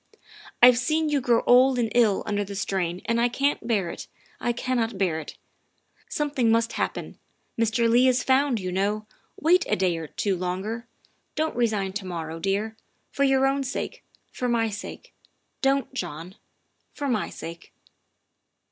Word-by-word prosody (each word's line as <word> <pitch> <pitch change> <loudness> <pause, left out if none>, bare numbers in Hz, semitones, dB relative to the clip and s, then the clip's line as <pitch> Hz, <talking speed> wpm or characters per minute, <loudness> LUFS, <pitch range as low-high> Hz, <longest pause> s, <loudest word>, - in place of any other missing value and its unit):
I've 245 0 +9
seen 310 +4 +1
you 290 -2 +1
grow 240 -2 +2
old 255 +1 +6
and 230 -3 0
ill 225 -5 +3
under 205 -1 -1
the 200 0 -7
strain 185 -3 -2
and 230 0 +1
I 240 - +3
can't 275 0 0
bear 200 -7 +1
it - - -8 0.3
I 240 - 0
can't 235 -3 -1
bear 180 -5 0
it. 155 - -9 0.7
Something 285 -6 0
must 230 0 +2
happen - - -3 0.4
Mr. 230 +1 +2
Leigh 240 +3 +5
is 255 -1 +2
found, 265 -2 +2
you 185 -1 -4
know. 205 +3 -1 0.3
Wait 345 +3 +4
a - - +3
day 180 -2 +1
or 160 - -6
two 195 +5 -1
longer. 190 +6 -3 0.5
Don't 315 +1 -1
resign 215 -5 0
to 205 -1 -4
morrow, 165 -2 -5
THE 195 +3 +1
WIFE 210 - -2
OF 220 0 -10
dear. - - -41 0.3
For 280 - 0
your 270 0 +3
own 275 +1 +1
sake, 260 - -4 0.3
for 250 - -2
my 225 -2 +1
sake, 205 - -8 0.5
don't, 270 0 +1
John 175 - -5 0.6
for 285 - -3
my 230 -6 0
sake. 170 +1 -9
230 Hz, 175 wpm, -25 LUFS, 195-255 Hz, 0.7 s, I've